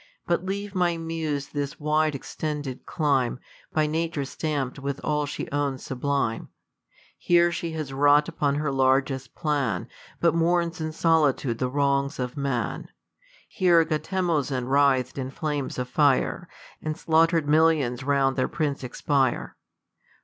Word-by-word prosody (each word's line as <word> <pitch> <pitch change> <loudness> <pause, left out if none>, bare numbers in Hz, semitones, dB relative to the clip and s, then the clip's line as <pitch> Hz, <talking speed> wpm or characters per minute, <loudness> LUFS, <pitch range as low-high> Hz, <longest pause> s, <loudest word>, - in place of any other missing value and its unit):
But 170 0 0
leave, 200 +1 -4
my 175 -3 +1
muse, 160 -4 -3
this 145 -1 -4
wide 155 0 +1
exten 150 +2 -4
Jed 130 -3 -7
clime, 135 -6 +1 0.3
By 155 -1 +2
nature 160 -1 -1
stamp'd 140 -2 -3
with 140 0 -3
all^slie 150 -1 -2
owns 140 -2 -1
sublime. 135 -3 -2 0.4
' - - -45 0.3
Here 175 0 +4
she 170 -1 -4
has 155 -4 -4
wrought 145 +2 +4
upon 145 -4 0
her 150 -1 -1
largest 135 -1 +1
plan. 140 - -1 0.3
But 170 -1 +3
mourns 170 0 +1
in 155 0 -2
solitude 150 -7 +2
the 125 - 0
wrongs 140 +1 +1
of 125 0 -3
man. 140 -4 -2 0.6
Here 175 -5 +4
Gautemozin 155 -5 -1
writh'd 135 -1 +2
in 130 0 -3
flames 145 -1 -3
of 125 -1 -2
fire. 140 +1 +1 0.3
And 155 0 -3
slaughter'd 165 -2 +3
millions 150 -5 +3
round 135 -1 +2
their 130 - +2
prince 145 -4 -2
expire. 130 +1 0
145 Hz, 140 wpm, -25 LUFS, 135-160 Hz, 0.6 s, Here